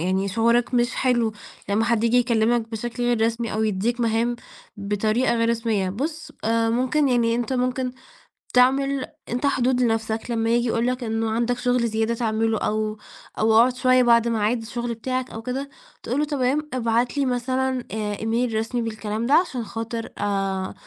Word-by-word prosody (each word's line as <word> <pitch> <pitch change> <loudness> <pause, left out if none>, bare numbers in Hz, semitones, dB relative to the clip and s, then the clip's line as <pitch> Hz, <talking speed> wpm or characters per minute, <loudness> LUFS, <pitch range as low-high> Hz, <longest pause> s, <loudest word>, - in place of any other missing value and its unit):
يعني 190 +3 0
شعورك 235 +4 +2
مش 240 0 +2
حلو، 240 -4 +1 0.4
لمّا 210 +3 +2
حد 230 -1 +1
ييجي 235 +1 +3
يكلّمك 235 -1 +2
بشكل 240 +2 -4
غير 240 -2 +1
رسمي، 230 0 -2
أو 215 +1 0
يدّيك 220 +3 0
مهام 230 +1 +1 0.4
بطريقة 215 +5 0
غير 230 0 +1
رسمية. 225 -4 0
بُص، 300 - -4
آآ 225 +1 +2
مُمكن، 260 +5 +1
يعني 235 -2 +2
أنت 240 +2 -2
مُمكن، 255 0 -1 0.6
تعمل 270 +2 +3 0.2
أنت 245 +4 -1
حدود 255 -2 +2
لنفسِك، 225 0 -1
لمّا 225 -1 0
ييجي 240 +1 +2
يقول 230 +1 0
لك 255 0 -1
إنه 225 0 -1
عندك 240 +2 0
شغل 245 -2 +1
زيادة 220 +1 0
تعمله، 225 -1 0
أو 215 0 -1 0.4
أو 220 +1 +3
اقعد 240 +3 +5
شوية 255 0 +4
بعد 235 -1 +4
ميعاد 225 +1 0
الشغل 235 +1 -4
بتاعك 255 +2 -3
أو 225 - -6
كده، 260 +4 -4 0.3
تقول 255 - -1
له: 300 - +2
"تمام. 290 +1 -1
ابعت 240 +1 0
لي 280 - +2
مثلًا 255 +1 -1
آآ 210 -1 -3
إيميل 225 +1 0
رسمي 225 +2 -1
بالكلام 220 0 -3
ده، 270 - +1
عشان 290 -8 +2
خاطر 225 +1 -5
آآ 195 -2 -1
235 Hz, 175 wpm, -23 LUFS, 225-250 Hz, 0.6 s, اقعد